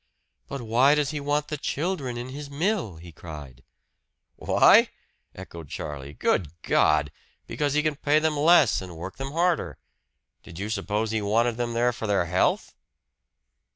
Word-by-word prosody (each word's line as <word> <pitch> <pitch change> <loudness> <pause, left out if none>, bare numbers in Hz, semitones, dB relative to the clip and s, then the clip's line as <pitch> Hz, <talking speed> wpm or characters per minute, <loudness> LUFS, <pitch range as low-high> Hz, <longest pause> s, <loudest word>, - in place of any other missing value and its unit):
"But 135 -3 -6
why 125 +6 +4
does 150 -1 0
he 150 - -3
want 145 +1 -1
the 150 - -3
children 145 -6 -2
in 120 +2 -6
his 140 +2 -8
mill?" 160 - -1
he 85 +1 -12
cried. 75 -5 -11 0.7
"Why?" - - +5 0.5
echoed 85 -5 -10
Charlie. 70 0 -7
"Good 85 0 -1
God! 75 -2 +2 0.3
Because 145 -1 -2
he 150 - +2
can 155 -2 -1
pay 150 +1 +2
them 155 0 +1
less 150 - +4
and 90 -3 -9
work 90 +3 -7
them 135 +1 -6
harder. 165 - 0 0.6
Did 85 - -13
you 105 +3 -4
suppose 105 +1 -2
he 110 -1 -1
wanted 115 +3 +1
them 120 -1 -2
there 120 +1 +1
for 115 -1 -5
their 100 -4 +1
health?" 90 +2 0
120 Hz, 160 wpm, -25 LUFS, 90-145 Hz, 0.7 s, Why